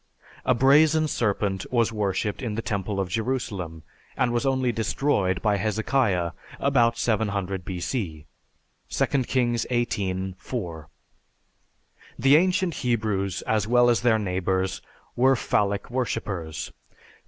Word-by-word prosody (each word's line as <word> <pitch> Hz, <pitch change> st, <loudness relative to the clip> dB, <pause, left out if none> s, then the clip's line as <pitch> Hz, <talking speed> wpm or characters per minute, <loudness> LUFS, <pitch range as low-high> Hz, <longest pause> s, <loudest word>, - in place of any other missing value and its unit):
A 130 Hz, -, +3 dB
brazen 155 Hz, +5 st, +5 dB
serpent 100 Hz, -7 st, -1 dB
was 115 Hz, -2 st, +2 dB
worshiped 105 Hz, +1 st, -1 dB
in 115 Hz, -5 st, -3 dB
the 115 Hz, -, -3 dB
temple 100 Hz, -1 st, -2 dB
of 95 Hz, -, 0 dB
Jerusalem, 100 Hz, -7 st, -3 dB, 0.3 s
and 120 Hz, -1 st, +1 dB
was 120 Hz, +3 st, 0 dB
only 130 Hz, -2 st, +1 dB
destroyed 110 Hz, -4 st, 0 dB
by 105 Hz, -2 st, +2 dB
Hezekiah 110 Hz, -4 st, +1 dB, 0.3 s
about 120 Hz, -4 st, +3 dB
700 100 Hz, -5 st, -1 dB
B.C. 90 Hz, -, -4 dB, 0.6 s
(2 -, -, +1 dB, 0.2 s
Kings 120 Hz, -2 st, 0 dB
XVIII, 95 Hz, -6 st, -1 dB
4). 85 Hz, -10 st, -6 dB, 1.3 s
The 135 Hz, +3 st, +5 dB
ancient 185 Hz, +1 st, +2 dB
Hebrews, 105 Hz, -6 st, -1 dB
as 110 Hz, -2 st, 0 dB
well 120 Hz, +1 st, +5 dB
as 120 Hz, -, +1 dB
their 120 Hz, -2 st, +4 dB
neighbors, 95 Hz, -1 st, -1 dB, 0.3 s
were 130 Hz, +2 st, +4 dB
phallic 100 Hz, -1 st, 0 dB
worshipers. 100 Hz, -, -3 dB
110 Hz, 120 wpm, -25 LUFS, 95-125 Hz, 1.3 s, brazen